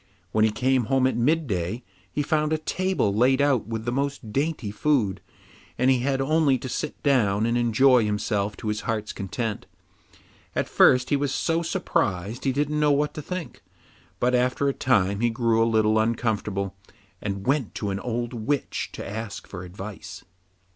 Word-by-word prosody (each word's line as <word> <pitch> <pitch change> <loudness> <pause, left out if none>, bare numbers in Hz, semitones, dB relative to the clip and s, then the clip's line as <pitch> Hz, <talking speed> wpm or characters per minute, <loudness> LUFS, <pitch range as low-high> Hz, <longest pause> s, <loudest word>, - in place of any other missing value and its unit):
When 110 +2 +2
he 110 - +5
came 125 +3 +1
home 130 +3 +2
at 130 - +1
midday, 120 - 0 0.3
he 145 - -1
found 155 +1 +1
a 155 - +2
table 185 - 0
laid 125 +5 +3
out 140 -6 +2
with 115 -1 -4
the 120 - 0
most 135 -4 -3
dainty 140 -7 -1
food, 110 -4 +1 0.6
and 130 +2 +3
he 130 - +3
had 135 +2 0
only 145 -1 +3
to 130 - -6
sit 145 +4 -4
down 110 -7 +3
and 115 +1 +1
enjoy 120 +1 +4
himself 105 -1 -1
to 110 - -4
his 105 0 -2
heart's 110 -2 -3
content. 105 +2 -4 0.9
At - - 0
first 125 0 +4
he - - +5
was 140 -1 0
so 165 +4 0
surprised 120 - -1
he 135 - +3
didn't 150 +3 0
know 150 -1 +4
what 145 +1 +1
to 155 - -6
think, 155 -6 -6 0.6
but 125 +1 +2
after 125 +3 +2
a 140 - +1
time 100 -7 +1
he 120 +1 +2
grew 115 -1 +2
a 115 - +2
little 110 -1 +3
uncomfortable, 105 -4 -1 0.5
and 100 -1 -4
went 135 -4 0
to 100 -2 -2
an 95 - -2
old 120 +1 -3
witch 125 +5 -2
to - - -6
ask 105 0 -6
for 90 -2 -8
advice. 95 0 -9
120 Hz, 180 wpm, -25 LUFS, 105-140 Hz, 0.9 s, he